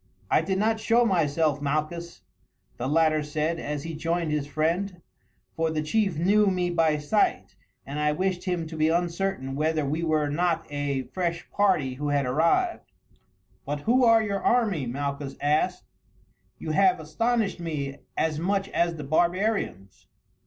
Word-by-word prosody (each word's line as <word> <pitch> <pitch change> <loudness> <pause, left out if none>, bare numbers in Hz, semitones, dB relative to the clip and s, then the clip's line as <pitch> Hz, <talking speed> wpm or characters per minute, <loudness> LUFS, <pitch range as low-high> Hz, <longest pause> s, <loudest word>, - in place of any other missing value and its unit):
"I - - +5
did 190 +3 -1
not 220 +2 +1
show 235 +2 +3
myself, 155 -6 +1
Malchus," 155 +4 -3 0.5
the 125 - -3
latter 155 +1 +3
said 155 +3 -2
as 150 -2 -4
he 165 - -5
joined 165 +1 -1
his 150 -2 -1
friend, 170 +5 -1 0.6
"for 165 0 0
the 155 -1 -2
chief 195 +1 0
knew 205 +5 +3
me 180 -2 +1
by 165 -3 +2
sight, 150 +9 0 0.3
and 145 +2 -5
I 150 0 +2
wished 185 +3 -1
him 175 -3 -1
to 160 +1 -8
be 155 0 +2
uncertain 170 -4 -1
whether 155 +1 0
we 155 +4 -1
were 155 -2 +1
not 165 +2 0
a 145 -2 -2
fresh 170 +2 -3
party 190 -10 +2
who 145 +3 -3
had 140 -1 +1
arrived." 170 - +1 0.7
"But 145 0 -4
who 250 - +3
are 230 -2 +6
your 200 -2 -2
army?" 205 - +1
Malchus 140 +2 -4
asked; 150 +2 +1 0.7
"you 155 - -4
have 185 +1 +3
astonished 225 +7 -1
me 145 -5 -4 0.2
as 155 -1 0
much 195 +3 0
as 170 0 0
the 150 - -6
barbarians." 170 - -1
160 Hz, 160 wpm, -26 LUFS, 150-190 Hz, 0.7 s, are